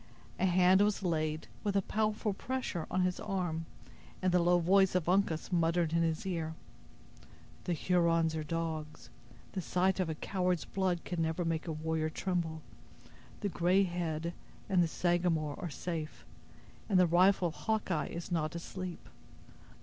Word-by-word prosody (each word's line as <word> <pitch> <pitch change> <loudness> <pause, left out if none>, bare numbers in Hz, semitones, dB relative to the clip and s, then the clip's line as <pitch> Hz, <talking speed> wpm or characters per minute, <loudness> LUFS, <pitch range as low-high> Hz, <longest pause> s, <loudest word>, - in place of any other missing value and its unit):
A 190 - +3
hand 185 +1 +5
was 205 -1 +2
laid, 155 -3 -1 0.2
with 205 -2 -1
a 195 - +3
powerful 215 0 0
pressure, 245 -7 -3
on 185 - +1
his 180 0 0
arm, 180 -6 -2 0.5
and 185 -1 +1
the 180 - +4
low 175 +1 +4
voice 190 +2 +4
of 180 -3 +1
Uncas 180 -3 +1
muttered 165 -1 +2
in 170 - +3
his 165 0 0
ear: 165 -4 -2 1.1
"The 180 - 0
Hurons 165 -1 +2
are 155 - -2
dogs. 155 -5 -4 0.4
The 190 - -3
sight 185 +2 +1
of 180 -3 0
a 160 - -2
coward's 180 +1 -1
blood 185 -3 -1
can 175 -2 -3
never 160 +2 0
make 165 0 -1
a - - -1
warrior 155 0 -1
tremble. 165 -2 -2 0.8
The 205 - 0
'Gray 180 +3 +3
Head' 170 -2 -2 0.3
and 185 -3 +3
the 170 - +3
Sagamore 170 -3 0
are 175 - -4
safe, 155 +1 -5 0.6
and 190 -3 +4
the 180 - +6
rifle 180 +1 +4
of - - -9
Hawkeye 205 -8 -1
is 170 +2 -6
not 155 -2 -1
asleep. 180 +1 -6
175 Hz, 160 wpm, -32 LUFS, 160-185 Hz, 1.1 s, the